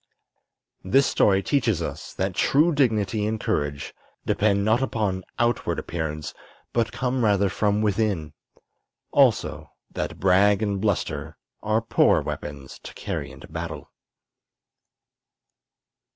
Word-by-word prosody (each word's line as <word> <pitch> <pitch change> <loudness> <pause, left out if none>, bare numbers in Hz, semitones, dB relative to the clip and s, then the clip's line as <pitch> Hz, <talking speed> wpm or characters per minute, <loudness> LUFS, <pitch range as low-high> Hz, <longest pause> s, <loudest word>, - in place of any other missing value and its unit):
This 135 +9 +4
story 95 -1 +3
teaches 120 - +1
us 75 -1 -5
that 95 0 -1
true 150 - +3
dignity 110 -6 +1
and 110 0 -2
courage 70 -5 -2 0.3
depend 100 -1 +2
not 110 +4 +3
upon 105 -7 -1
outward 120 0 0
appearance, 80 -2 -4 0.4
but 115 -1 +1
come 125 -1 -1
rather 100 -2 +3
from 105 +2 0
within; 100 -7 0 0.8
also - - +2 0.2
that - - -4
brag 100 +3 +4
and 100 -2 -1
bluster 100 -4 -2 0.2
are 110 +1 0
poor 115 - +3
weapons 70 -3 -7
to - - -11
carry - - -4
into - - -12
battle. - - -6
105 Hz, 115 wpm, -24 LUFS, 95-110 Hz, 0.8 s, This